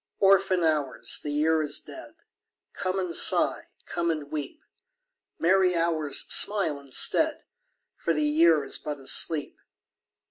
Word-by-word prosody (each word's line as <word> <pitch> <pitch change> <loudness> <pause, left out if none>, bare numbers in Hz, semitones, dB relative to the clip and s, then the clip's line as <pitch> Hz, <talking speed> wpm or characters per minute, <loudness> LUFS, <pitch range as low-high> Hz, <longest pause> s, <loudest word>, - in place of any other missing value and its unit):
Orphan 195 -2 +2
Hours, 150 -5 -1
the 150 - -6
Year 155 +2 +1
is 150 -1 -2
dead, 325 -1 -13 0.6
Come 185 0 -4
and 180 -3 -3
sigh, - - +3 0.2
come 170 -1 -3
and 155 -3 -4
weep! 155 - -7 0.7
Merry 185 +1 +2
Hours, 160 -3 0
smile 190 -8 +1
instead, 140 -2 +1 0.5
For 170 - -2
the 150 -2 -1
Year 155 0 +3
is 135 - -3
but 150 -1 -6
asleep. 145 +3 +1
160 Hz, 130 wpm, -25 LUFS, 150-185 Hz, 0.7 s, sigh